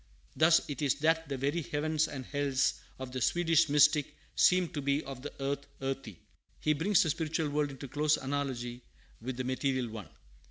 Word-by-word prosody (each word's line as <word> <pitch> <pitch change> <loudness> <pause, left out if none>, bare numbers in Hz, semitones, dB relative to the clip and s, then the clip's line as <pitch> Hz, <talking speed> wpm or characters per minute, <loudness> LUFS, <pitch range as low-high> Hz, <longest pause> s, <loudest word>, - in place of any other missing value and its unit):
Thus 160 +1 +4
it 145 -2 -5
is 140 -3 +2
that 160 0 +2
the 135 - -2
very 140 +6 0
"heavens" 155 +1 0
and 135 -3 -6
"hells" 140 -1 0 0.2
of 130 -1 -7
the 130 0 -4
Swedish 165 +2 +3
mystic 150 0 +4 0.2
seem 180 -1 +4
to 145 - -4
be 140 +2 0
"of 135 -2 -8
the 145 - -6
earth, 140 +1 -2
earthy." 135 -8 -4 0.4
He 155 - +2
brings 175 +6 +3
the 160 - +1
spiritual 155 0 -2
world 150 0 0
into 135 0 -8
close 150 +3 +2
analogy 130 -3 -3 0.4
with 125 +1 -5
the 130 - -2
material 130 -1 -1
one. 105 -7 -8
145 Hz, 185 wpm, -31 LUFS, 130-155 Hz, 0.4 s, Thus